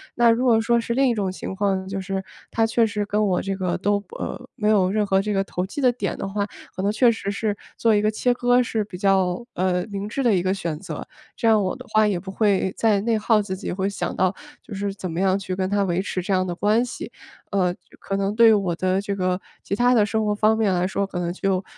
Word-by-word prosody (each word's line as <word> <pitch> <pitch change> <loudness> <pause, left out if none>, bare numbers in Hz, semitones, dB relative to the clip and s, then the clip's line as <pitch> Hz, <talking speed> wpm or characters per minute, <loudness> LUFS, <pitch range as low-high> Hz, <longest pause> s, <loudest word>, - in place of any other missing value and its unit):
那 240 -1 +5
如 230 +2 +3
果 230 -3 +4
说 235 +1 +2
是 235 - -2
另 270 +1 +3
一 240 - +2
种 200 -4 -1
情 190 - -6
况， 190 -1 0
就 195 0 -3
是 190 0 -3 0.3
他 225 - +2
确 225 +1 +2
实 210 -1 -2
跟 210 +1 +1
我 185 -2 +1
这 195 0 -2
个 185 -2 -1
都 200 +2 0 0.2
呃， 250 0 -6
没 210 - -1
有 195 -4 +3
任 210 0 +1
何 195 -1 +2
这 210 +1 -2
个 195 - +2
投 180 -1 -3
机 200 - -7
的 250 -3 +3
点 205 -5 -3
的 - - -4
话， 200 +1 -1 0.3
可 185 - -3
能 205 - +2
确 235 +3 +4
实 210 -3 -2
是 210 0 -1 0.2
做 225 -1 +3
一 205 - +3
个 215 - +2
切 245 +3 +1
割 245 0 +3
是 225 -2 -1
比 190 -3 -9
较， 190 +2 +1
呃， 180 0 0
明 200 +1 -4
智 270 +4 -2
的 230 -4 +4
一 180 - +2
个 185 +1 0
选 170 -6 -4
择， 190 - -7 0.3
这 230 - 0
样 215 -2 +5
我 185 - -1
的 255 0 -11
话 215 0 +5
也 190 -4 0
不 190 +1 -8
会 195 -2 +1
再 215 -3 +2
内 230 +2 +1
耗 215 0 +3
自 190 -2 -4
己， 190 - -5
或 190 +2 -1
想 200 - -3
到 185 +1 +2 0.3
就 210 - -10
是 200 0 -2
怎 185 -2 -6
么 165 - -3
样 190 0 +3
去 185 -2 -4
跟 185 0 -1
他 200 0 +1
维 180 -1 0
持 190 -1 -3
这 195 +2 -2
样 185 0 +2
的 175 - -3
关 215 +6 +2
系。 250 - -6 0.4
呃， 185 -3 +1 0.3
可 195 - -3
能 195 +1 0
对 230 -1 +7
于 - - +6
我 190 -5 +1
的 185 +2 +1
这 200 0 -3
个 185 -1 0 0.2
其 200 - -2
它 245 +3 +3
的 220 - +5
生 220 +1 -1
活 210 - +1
方 215 +1 +3
面 205 -4 +2
来 180 +1 +1
说， 200 +1 -1
可 185 -2 -5
能 175 -1 -1
就 190 0 -1
200 Hz, 290 characters per minute, -23 LUFS, 190-220 Hz, 0.4 s, 对